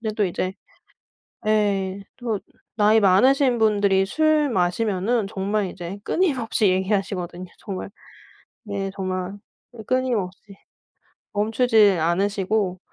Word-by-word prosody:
근데 220 -2 -3
또 210 - +1
이제 185 0 -2 1.0
예 200 -2 +1 0.2
또 230 -5 -2 0.4
나이 215 0 +4
많으신 250 +7 +4
분들이 200 -3 +3
술 310 +5 +2
마시면은 200 +2 0
정말 200 0 -1
이제 180 +2 -7
끊임없이 255 - +1
얘기하시거든요. 185 -2 -1
정말 195 -1 -6 0.8
네 200 -2 -3
정말 185 -1 -3 0.5
끊임없이. 215 -6 -2 0.8
멈추지 220 0 +4
않으시고. 190 +3 0
205 Hz, 235 characters per minute, -23 LUFS, 190-225 Hz, 1.0 s, 나이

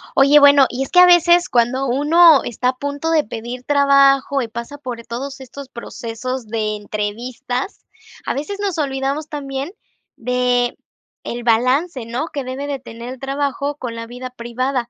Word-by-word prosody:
Oye, 280 +2 +6
bueno, 285 -1 +7
y 255 +2 -3
es - - -7
que 360 - +5
a 360 - +10
veces 350 0 +5
cuando 245 +3 +1
uno 300 +4 +5
está 250 +2 -1
a 255 - -2
punto 285 +4 -3
de 310 -2 +3
pedir 235 +3 -7
trabajo 275 0 +3
y 240 - -3
pasa 235 +6 -7
por 250 -5 -7
todos 270 +3 -6
estos 265 +1 -10
procesos 235 +1 -6
de 215 -1 -2
entrevistas, 235 - -5 0.4
a - - -1
veces 395 +9 -5
nos 390 -4 -2
olvidamos 280 +1 -2
también 275 +1 -5 0.5
de, 245 0 0 0.5
el 240 0 -5
balance, 255 +5 +1
¿no? 240 +7 -3
Que 285 -3 -3
debe 260 +3 -5
de 280 -2 -3
tener 235 -1 -9
el 260 - -13
trabajo 280 +1 -2
con 245 -4 -6
la 230 0 -6
vida 250 +2 -8
privada. 250 +1 -3
265 Hz, 170 wpm, -19 LUFS, 240-285 Hz, 0.5 s, a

